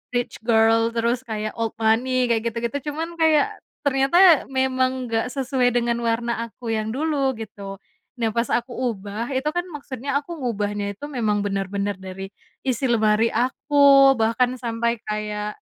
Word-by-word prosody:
rich 245 - -2
girl, 225 0 +4
terus 235 +2 0
kayak 215 -1 -3
old 225 0 -2
money 240 +3 +1
kayak 230 0 +1
gitu-gitu, 235 +6 -4
cuman 330 +2 -5
kayak 315 -2 +3 0.2
ternyata 285 +5 +5
memang 260 -1 0
nggak 225 +2 0
sesuai 260 -2 +1
dengan 235 -1 +1
warna 230 0 -1
aku 230 +1 -7
yang 215 -1 -1
dulu 285 -3 0
gitu. 200 -2 -7 0.4
Nah 225 -2 0
pas 235 0 0
aku 240 +1 -1
ubah 225 -1 -3
itu 265 +2 -2
kan 350 - 0
maksudnya 280 -2 -4
aku 340 +4 -9
ngubahnya 205 -4 -2
itu 290 - -7
memang 220 -7 0
bener-bener 200 +1 -2
dari 190 +1 -7 0.4
isi 255 0 -1
lemari 220 0 +3
aku 275 +3 +5
bahkan 245 +3 +1
sampai 235 0 -1
kayak 210 0 -4
235 Hz, 150 wpm, -23 LUFS, 220-265 Hz, 0.4 s, ternyata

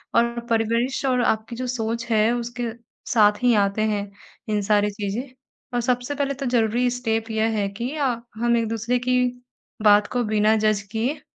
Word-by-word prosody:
और 235 0 +2
परिवेश 230 +4 0
और 250 -2 +2
आपकी 220 +1 0
जो 255 +1 -4
सोच 230 -1 -2
है, 220 +1 +3
उसके 240 -1 -3 0.4
साथ 210 0 +4
ही 245 -1 +5
आते 200 +1 +1
हैं, 205 -1 -2 0.4
इन 210 -1 +1
सारी 210 0 +2
चीज़ें। 205 +6 -4 0.4
और 240 - +1
सबसे 245 +3 -1
पहले 280 -1 -1
तो 275 0 -5
ज़रूरी 240 0 +2
स्टेप 225 -2 -2
यह 220 0 0
है 200 -1 0
कि 235 +6 -4
अ, 255 -6 0
हम 235 +1 +2
एक-दूसरे 230 +2 0
की 250 0 +1 0.6
बात 210 0 +6
को 245 -1 0
बिना 215 0 +3
जज 215 -1 +2
किए 250 +7 -2
230 Hz, 175 wpm, -23 LUFS, 215-245 Hz, 0.6 s, बात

